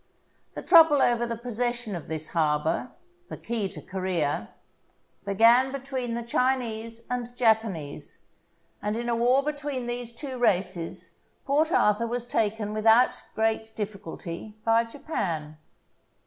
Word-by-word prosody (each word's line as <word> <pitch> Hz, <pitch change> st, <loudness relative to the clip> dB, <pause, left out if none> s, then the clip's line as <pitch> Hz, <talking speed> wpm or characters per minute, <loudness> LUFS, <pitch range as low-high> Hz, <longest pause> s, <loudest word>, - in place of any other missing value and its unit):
The -, -, -5 dB
trouble 320 Hz, -3 st, +7 dB
over 240 Hz, -2 st, +2 dB
the 230 Hz, -1 st, -3 dB
possession 240 Hz, -2 st, -2 dB
of 170 Hz, -, -7 dB
this 155 Hz, -1 st, -3 dB
harbour 155 Hz, +6 st, 0 dB, 0.2 s
— 355 Hz, 0 st, -37 dB
the -, -, -6 dB
key 220 Hz, -4 st, -2 dB
to -, -, -9 dB
Corea 175 Hz, -, -2 dB, 0.4 s
— -, -, -40 dB
began 235 Hz, +6 st, +5 dB
between 260 Hz, -3 st, -4 dB
the 235 Hz, -, -3 dB
Chinese 230 Hz, -2 st, -1 dB
and 245 Hz, 0 st, -4 dB
Japanese; 215 Hz, -, 0 dB, 0.6 s
and 210 Hz, +2 st, -2 dB
in 240 Hz, 0 st, -3 dB
a 235 Hz, -, +1 dB
war 250 Hz, +4 st, +3 dB
between 290 Hz, -3 st, -3 dB
these 240 Hz, -1 st, -3 dB
two 255 Hz, +1 st, -6 dB
races 185 Hz, -6 st, -1 dB, 0.3 s
Port 305 Hz, +4 st, +2 dB
Arthur 210 Hz, -2 st, +3 dB
was 240 Hz, +1 st, -3 dB
taken 215 Hz, -2 st, -1 dB
without 225 Hz, +3 st, +4 dB
great 220 Hz, 0 st, 0 dB
difficulty 200 Hz, -1 st, -6 dB
by 230 Hz, +1 st, +4 dB
Japan. 170 Hz, -, -4 dB
230 Hz, 135 wpm, -27 LUFS, 200-245 Hz, 0.6 s, trouble